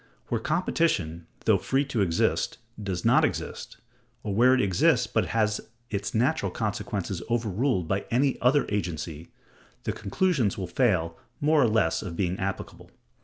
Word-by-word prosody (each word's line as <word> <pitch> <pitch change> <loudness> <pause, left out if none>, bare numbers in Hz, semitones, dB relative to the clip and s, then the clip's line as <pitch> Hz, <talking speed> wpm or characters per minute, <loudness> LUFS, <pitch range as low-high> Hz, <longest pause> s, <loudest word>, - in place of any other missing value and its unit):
Where 115 -2 -1
competition, 115 - 0 0.2
though - - +4
free 135 +2 +1
to 130 -6 -1
exist, 85 -4 +1 0.2
does 95 -4 -3
not - - +5
exist, - - -3 0.5
or 105 - -2
where 125 +5 +5
it - - +1
exists, 95 -6 +3
but - - 0
has 105 -1 +1 0.3
its 100 +1 -3
natural 130 +8 +1
consequences 105 -4 -3
overruled 115 - 0
by 95 +4 -1
any 130 +3 +1
other 135 +4 +4
agency, 85 -5 -4 0.5
the - - -1
conclusions 115 - 0
will 95 - -3
fail 90 -6 +1 0.2
more 155 0 +3
or 125 - +5
less 110 -2 +2
of 90 -5 -6
being 95 -1 -1
applicable. 95 0 -5
105 Hz, 150 wpm, -27 LUFS, 95-125 Hz, 0.5 s, not